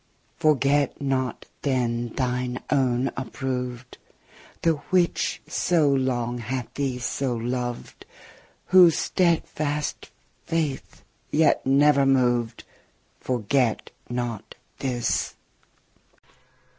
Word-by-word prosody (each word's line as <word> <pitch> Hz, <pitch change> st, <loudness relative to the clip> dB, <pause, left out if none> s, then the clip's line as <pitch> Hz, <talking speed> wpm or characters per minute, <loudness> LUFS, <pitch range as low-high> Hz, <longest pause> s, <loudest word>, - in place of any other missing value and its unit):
Forget 145 Hz, -2 st, +2 dB
not 130 Hz, -3 st, -2 dB, 0.2 s
yet 120 Hz, -4 st, -1 dB
thine 125 Hz, -1 st, -1 dB
own 130 Hz, -2 st, +2 dB
approved, 125 Hz, -1 st, -5 dB, 0.6 s
The 165 Hz, -, +4 dB, 0.2 s
which 180 Hz, -2 st, +1 dB
so 165 Hz, -5 st, +2 dB
long 125 Hz, -3 st, 0 dB
hath 120 Hz, +1 st, -4 dB
thee 135 Hz, -3 st, -2 dB
so 125 Hz, +1 st, -2 dB
loved, 120 Hz, +1 st, -4 dB, 0.6 s
Whose 180 Hz, -3 st, +7 dB
steadfast 155 Hz, -4 st, -1 dB, 0.3 s
faith 155 Hz, -5 st, -3 dB, 0.3 s
yet 155 Hz, +1 st, +3 dB
never 140 Hz, 0 st, +4 dB
moved, 120 Hz, -3 st, +1 dB, 0.6 s
Forget 125 Hz, 0 st, 0 dB, 0.2 s
not 120 Hz, -3 st, -4 dB, 0.2 s
this. 125 Hz, -3 st, -1 dB
130 Hz, 80 wpm, -25 LUFS, 120-145 Hz, 0.6 s, Whose